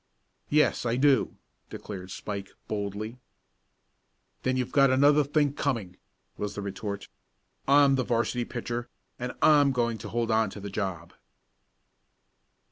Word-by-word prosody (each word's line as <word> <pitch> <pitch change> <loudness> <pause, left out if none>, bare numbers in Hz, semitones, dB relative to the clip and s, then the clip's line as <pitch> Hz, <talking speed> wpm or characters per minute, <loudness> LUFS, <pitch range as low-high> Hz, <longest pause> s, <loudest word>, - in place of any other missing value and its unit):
"Yes, 150 +1 +3
I 120 -1 0
do," 135 -1 +3 0.3
declared 95 -3 -7
Spike 100 0 -5 0.2
boldly. 105 +3 -4 1.2
"Then 130 0 0
you've 125 -2 -2
got 140 -1 +5
another 145 +3 +5
think 145 0 +1
coming!" 115 -13 -2 0.4
was 105 -1 -4
the 105 - -4
retort. 100 +1 -5 0.6
"I'm 140 0 +6
the 130 -1 +1
'varsity 120 +1 0
pitcher, 120 0 -4 0.3
and 125 0 -3
I'm 145 -2 +6
going 120 -3 0
to - - -7
hold 115 -1 -1
on 110 -1 +3
to 100 - -9
the 100 0 -7
job!" 95 -5 -4
120 Hz, 130 wpm, -28 LUFS, 100-135 Hz, 1.2 s, I'm